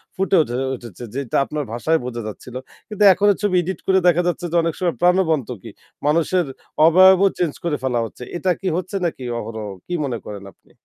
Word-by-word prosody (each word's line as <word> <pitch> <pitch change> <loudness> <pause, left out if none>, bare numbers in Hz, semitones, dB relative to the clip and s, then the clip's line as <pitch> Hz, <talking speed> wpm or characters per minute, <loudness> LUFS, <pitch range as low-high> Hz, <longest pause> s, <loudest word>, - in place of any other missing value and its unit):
ফুটে 195 0 +1
উঠে 120 -2 -4 0.2
উঠেছে 120 -3 -11
যেটা 135 -3 -4
আপনার 150 -1 -4
ভাষায় 160 +7 +1
বোঝা 120 -2 -4
যাচ্ছিল। 120 +3 -9 0.3
কিন্তু 210 -1 -1
এখনো 205 +3 +3
ছবি 205 -3 +1
এডিট 180 +1 -4
করে 190 0 +4
দেখা 175 0 +4
যাচ্ছে 175 0 -2
যে - - -2
অনেক 165 - 0
সময় 175 -6 0
প্রাণবন্ত 170 - +2
কি? - - -10 0.4
মানুষের 170 +3 +2 0.4
অবয়বও 190 +3 +7
চেঞ্জ 170 -5 0
করে 155 -4 -1
ফেলা 125 -3 0
হচ্ছে। 115 - -10
এটা 185 +1 0
কি 195 - -3
হচ্ছে 185 +2 -5
নাকি 160 -6 -3 0.2
অহরহ 110 -1 -6 0.2
কি 180 - -4
মনে 125 -4 -3
করেন 100 -1 -8
আপনি? - - -30
165 Hz, 195 wpm, -21 LUFS, 125-185 Hz, 0.4 s, অবয়বও